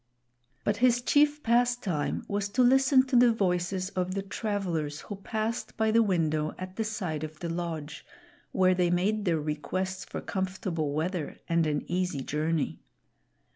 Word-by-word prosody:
But 205 0 +1
his 245 +1 +4
chief 295 +4 +3
pastime 235 -9 +1
was 205 0 -1
to 255 - +6
listen 265 +1 +5
to 260 -1 -1
the 245 0 +7
voices 185 -2 0
of 185 0 -2
the 195 - -2
travelers 185 -8 -2
who 205 - -7
passed 220 +3 -3
by 220 0 +2
the 230 +1 +5
window 160 -7 +1
at 185 0 -7
the 225 - -1
side 185 -8 -3
of 155 -1 -7
the 170 - -4
lodge, 165 -3 -4 0.5
where 185 -1 +4
they 180 -1 +2
made 200 +5 +1
their 165 -3 +2
requests 185 +6 -3
for - - -6
comfortable 185 -5 -2
weather 160 +1 -2
and 165 -1 +2
an 145 -1 -1
easy 180 -5 -1
journey. 155 +1 -1
185 Hz, 160 wpm, -28 LUFS, 165-220 Hz, 0.5 s, the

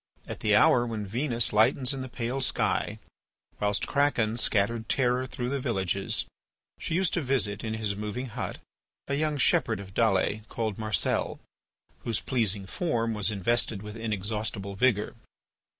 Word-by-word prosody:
At - - -6
the - - +3
hour 120 - +6
when 110 -3 -3
Venus 120 +2 0
lightens 125 +5 +4
in 135 - -4
the 130 - -6
pale 120 +3 -3
sky, 130 - 0 0.6
whilst 105 0 +1
Kraken 120 -6 +1
scattered 110 +1 +1
terror 125 0 +1
through 125 0 -4
the 140 +1 -1
villages, 100 -6 0 0.5
she 165 - -2
used 185 -1 +1
to 175 - +1
visit 125 -7 +1
in 110 -1 -2
his 105 -2 -1
moving 105 +5 -4
hut, 105 -4 -4 0.5
a 140 - -2
young 150 +1 0
shepherd 120 - +3
of 95 -1 -9
Dalles 105 -1 +2
called 110 -3 -3
Marcel, 110 -1 0 0.6
whose 115 -2 -1
pleasing 105 -6 0
form 115 - -1
was 105 -1 +1
invested 105 0 +1
with 105 0 -7
inexhaustible 105 -2 -3
vigour. 105 0 +2
115 Hz, 150 wpm, -28 LUFS, 105-125 Hz, 0.6 s, hour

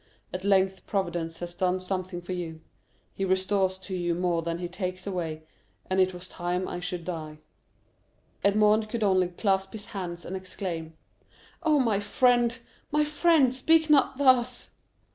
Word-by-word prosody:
At 185 0 -4
length 190 -1 +2
Providence 170 -5 -2
has 175 0 -5
done 185 +1 0
something 185 -1 -3
for 185 - -4
you; 165 -3 -5 0.5
he 195 - -3
restores 190 0 +1
to 190 0 -6
you 175 -1 0
more 175 -1 0
than 165 0 -3
he 175 0 -4
takes 185 0 -5
away, 165 -5 -3 0.5
and 190 - +2
it 185 0 +4
was 180 0 -9
time 180 +1 -2
I 175 - -4
should 180 -1 -5
die." 155 -4 -5 1.1
Edmond 210 +1 +4
could 230 -1 -2
only 185 -3 +3
clasp 190 +1 0
his 210 -2 -7
hands 180 -5 -6
and 185 - -5
exclaim, 175 -4 -5 0.6
"Oh, 305 -3 +3
my 225 -6 +2
friend, 240 +2 +3 0.3
my 300 +1 +3
friend, 300 -3 +4
speak 315 +4 +3
not 275 -3 +4
thus!" 255 -3 +3
190 Hz, 160 wpm, -27 LUFS, 175-215 Hz, 1.1 s, it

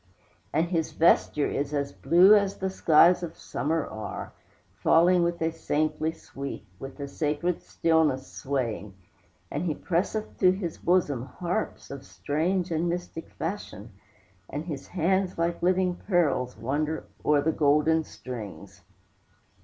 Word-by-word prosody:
And 165 +3 +1
his 165 -3 -1
vesture 155 -2 +3
is 145 +1 -2
as 140 -1 -1
blue 175 +8 +6
As 200 -2 +3
the 190 0 -2
skies 175 0 +5
of 170 -2 -6
summer 160 +1 -2
are, 110 -1 -7 0.4
Falling 175 +2 +4
with 170 0 0
a 160 - +1
saintly 155 0 -1
sweep, 140 -3 -8
With 135 +2 -9
a 140 - -4
sacred 155 +4 -1
stillness 160 -5 +1
swaying; 115 -7 -3 0.6
And 150 +5 -2
he 155 -4 -1
presseth 190 +7 -2
to 185 -1 +6
his 185 -4 -5
bosom 145 -8 +1
Harps 175 +9 -4
of 140 -1 -7
strange 175 +5 -1
and 165 +2 0
mystic 175 -1 -5
fashion, 160 - -6 0.6
And 145 +3 -4
his 145 -5 -6
hands, 185 +2 0
like 170 0 -1
living 185 0 +2
pearls, 145 -9 +1
Wander 145 +7 -2 0.2
o'er 150 -1 +3
the 160 - +2
golden 150 +2 +3
strings. 100 -8 -9
160 Hz, 135 wpm, -27 LUFS, 140-175 Hz, 0.6 s, blue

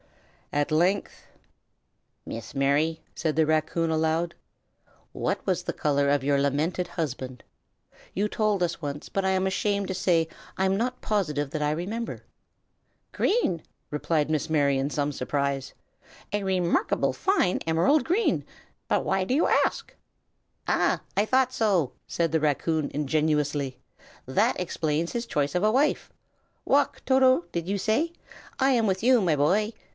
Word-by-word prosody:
At 145 0 +1
length 180 +6 0 1.0
"Miss 115 - -7
Mary," 145 +4 +1
said 160 -2 -1
the 160 - +4
raccoon 155 +2 +1
aloud, 160 +2 0 0.8
"what - - -2
was - - 0
the - - -2
color 140 -1 +1
of 140 -1 +2
your 140 -1 +2
lamented 155 +6 0
husband? 130 -5 -4 0.7
You 205 +2 0
told 210 -3 0
us 170 0 -2
once, 145 -1 -5
but 195 - -2
I 190 - +2
am 190 0 +1
ashamed 200 +1 0
to - - -1
say 170 -3 +2 0.3
I'm 190 0 +2
not 250 +4 -1
positive 150 -9 -1
that 155 - -3
I 150 - +1
remember." 210 +9 -4 0.9
"Green!" 380 - +1 0.3
replied 150 0 0
Miss 155 0 -1
Mary, 140 -3 +2
in 135 +1 -1
some 145 0 -1
surprise, 140 0 -2 0.6
"a 205 -1 0
remarkably 185 -2 +1
fine 375 - +1
emerald 170 - +2
green. 390 +7 +1 0.5
But - - +1
why 190 - +1
do 220 - -1
you 315 - +3
ask?" - - +1 0.7
"Ah, - - +2 0.2
I 205 - +3
thought 255 +2 +2
so!" 190 - +1
said 165 -2 0
the 160 - +2
raccoon, 155 +1 0
ingenuously. 150 -2 0 0.5
"That 130 - +1
explains 165 -2 -1
his 235 0 -3
choice 145 -6 -1
of 180 - +1
a 215 - +4
wife. 280 +5 +1 0.5
Walk, - - +2
Toto, 260 -7 +4
did 170 +1 -3
you 200 - 0
say? 225 - +1 0.5
I 270 0 +4
am 230 -4 +2
with 190 -1 0
you, 250 -1 +5
my 170 -5 +2
boy!" 190 +10 +2
165 Hz, 150 wpm, -26 LUFS, 150-205 Hz, 1.0 s, you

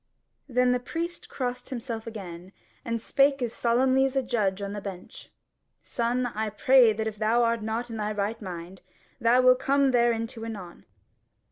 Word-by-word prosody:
Then 250 0 +3
the 250 - +1
priest 335 +7 -5
crossed 250 -1 -4
himself 235 -3 -5
again, 185 -4 -8 0.3
and 230 0 -2
spake 275 +4 +2
as 235 -1 -2
solemnly 260 +3 +2
as 270 0 0
a 270 - +2
judge 210 -6 0
on 200 0 -4
the 205 - -5
bench: 190 -2 -9 0.5
"Son, 245 +1 -1
I 220 -2 -2
pray 240 +3 +5
that 220 +1 -3
if 220 -1 -4
thou 230 +2 +3
art 230 -1 +1
not 225 +2 -3
in 225 - -5
thy 210 0 -2
right 210 +2 -2
mind, 180 -1 -8 0.4
thou 235 +2 +4
will 255 0 +7
come 275 +1 +2
thereinto 235 -1 +1
anon. 200 -6 -8
230 Hz, 170 wpm, -27 LUFS, 210-250 Hz, 0.5 s, will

